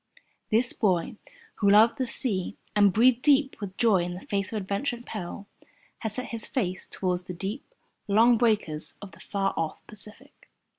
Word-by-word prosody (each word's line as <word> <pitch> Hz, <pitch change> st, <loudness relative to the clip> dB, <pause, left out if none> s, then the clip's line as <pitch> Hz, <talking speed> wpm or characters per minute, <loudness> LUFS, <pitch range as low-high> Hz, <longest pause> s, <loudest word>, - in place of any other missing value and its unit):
This 235 Hz, +2 st, +3 dB
boy, 185 Hz, -2 st, 0 dB, 0.4 s
who 200 Hz, -, +3 dB
loved 220 Hz, +6 st, +5 dB
the 260 Hz, -, 0 dB
sea 200 Hz, -7 st, -2 dB, 0.2 s
and 205 Hz, -1 st, +5 dB
breathed 240 Hz, +4 st, +4 dB
deep 280 Hz, -1 st, +3 dB
with 195 Hz, -1 st, -6 dB
joy 225 Hz, -5 st, +4 dB
in 175 Hz, 0 st, -2 dB
the 180 Hz, -, -10 dB
face 200 Hz, -1 st, -2 dB
of 220 Hz, -, -2 dB
adventure 205 Hz, +6 st, -2 dB
and 240 Hz, 0 st, -13 dB
peril, 200 Hz, -1 st, -6 dB, 0.5 s
had 220 Hz, -, -3 dB
set 255 Hz, +4 st, -5 dB
his 230 Hz, -2 st, -4 dB
face 185 Hz, -8 st, -2 dB
towards 180 Hz, -1 st, -2 dB
the 180 Hz, -, -6 dB
deep, 195 Hz, +5 st, -4 dB, 0.4 s
long 225 Hz, +4 st, +5 dB
breakers 170 Hz, -11 st, 0 dB
of 200 Hz, -, -10 dB
the -, -, -17 dB
far 195 Hz, -1 st, -1 dB
off 160 Hz, -1 st, -3 dB
Pacific. 215 Hz, +7 st, -10 dB
210 Hz, 180 wpm, -27 LUFS, 185-235 Hz, 0.5 s, loved